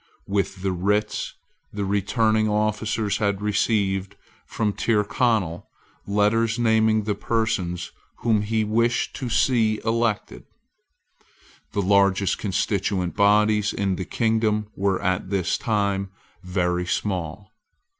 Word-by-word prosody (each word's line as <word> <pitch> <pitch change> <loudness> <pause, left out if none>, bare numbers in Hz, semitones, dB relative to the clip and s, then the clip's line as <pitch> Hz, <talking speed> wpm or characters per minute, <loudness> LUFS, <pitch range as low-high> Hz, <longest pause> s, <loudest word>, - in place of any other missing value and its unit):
With 100 -1 -2
the 95 - +1
writs 105 +4 -1 0.4
the 100 -1 -3
returning 110 +2 +1
officers 105 0 0
had 100 -2 0
received 100 -2 0 0.3
from 105 -2 -1
Tyrconnel 105 -5 0 0.4
letters 105 +3 +2
naming 110 -2 +3
the 105 0 -1
persons 100 -5 -2 0.3
whom 110 -3 +2
he 110 +1 0
wished 115 +3 0
to 125 - -4
see 115 -3 +2
elected. 115 -2 -1 1.3
The 100 - 0
largest 100 0 +3
constituent 95 -2 -1
bodies 105 +1 +3
in 95 -2 -1
the 95 - -4
kingdom 110 -1 0
were 95 -1 0
at 95 0 -1
this 95 -3 0
time 100 -3 -1 0.3
very 90 -1 -1
small. 95 +2 -3
105 Hz, 110 wpm, -24 LUFS, 95-110 Hz, 1.3 s, naming